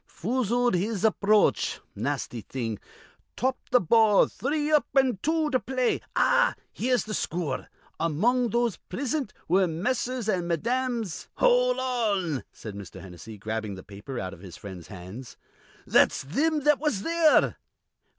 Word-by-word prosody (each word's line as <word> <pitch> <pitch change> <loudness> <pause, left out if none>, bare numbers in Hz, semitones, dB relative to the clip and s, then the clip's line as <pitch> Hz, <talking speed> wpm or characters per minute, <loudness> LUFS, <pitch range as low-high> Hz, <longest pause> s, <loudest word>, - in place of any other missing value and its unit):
'Foozled 245 +3 0
his 200 +3 0
aproach,' 215 -1 +3
nasty 120 - -3
thing. 115 -3 -4 0.6
'Topped 260 +1 -2
th' 245 -9 +3
ball.' 220 -1 +6
'Three 295 +3 -2
up 300 -1 +4
an' 260 -7 +3
two 315 -1 +1
to 255 - +3
play.' 255 -1 0
Ah, - - +3 0.2
here's 245 -2 +1
the 215 - -6
scoor. 160 -9 -2 0.3
'Among 225 +11 +2
those 235 -1 0
prisint 265 +2 -2 0.2
were 185 +2 +3
Messrs. 240 +7 -2
an' 180 -5 0
Mesdames'" 235 +3 -1
"Hol' - - +3
on!" 205 - 0 0.2
cried 110 - -7
Mr. 100 -3 -9
Hennessy, 95 +4 -10
grabbing 110 0 -4
the 95 - -10
paper 105 +6 -8
out 95 0 -4
of 90 - -12
his 90 -2 -11
friend's 95 -4 -9
hands. 100 +6 -10 0.5
"That's - - +3
thim 300 - 0
that 295 0 +3
was 270 -10 -1
there." 330 -2 +3
215 Hz, 140 wpm, -27 LUFS, -, 0.6 s, ball